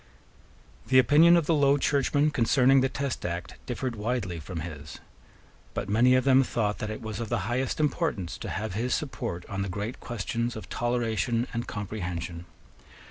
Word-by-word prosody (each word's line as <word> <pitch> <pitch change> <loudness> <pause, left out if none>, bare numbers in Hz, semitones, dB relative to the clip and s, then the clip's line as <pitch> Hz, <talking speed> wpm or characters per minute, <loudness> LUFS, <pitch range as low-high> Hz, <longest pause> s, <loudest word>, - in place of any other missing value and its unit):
The 130 - +4
opinion 155 +7 +7
of 170 - +1
the 165 - +2
Low 140 -2 +4
Churchmen 145 +1 +2
concerning 130 +2 +4
the 130 - +2
Test 140 -1 -3
Act 85 0 -5
differed 125 0 -3
widely 105 -5 -2
from 80 +1 -6
his. 75 -2 -8 0.8
But 105 - -3
many 120 +5 +5
of 130 - +3
them 135 -1 +5
thought 110 -5 -1
that 110 - -3
it 110 +2 -6
was 110 -2 -5
of 115 -2 -4
the 120 -3 0
highest 125 +6 -1
importance 150 - -1
to - - -5
have 105 0 -3
his 120 +4 0
support 90 - -4
on 100 -2 -4
the 100 - -2
great 105 +6 -4
questions 120 +1 -3
of 110 - -8
Toleration 120 -1 0
and 120 +1 -3
Comprehension. 90 -4 -5
115 Hz, 175 wpm, -27 LUFS, 100-130 Hz, 0.8 s, opinion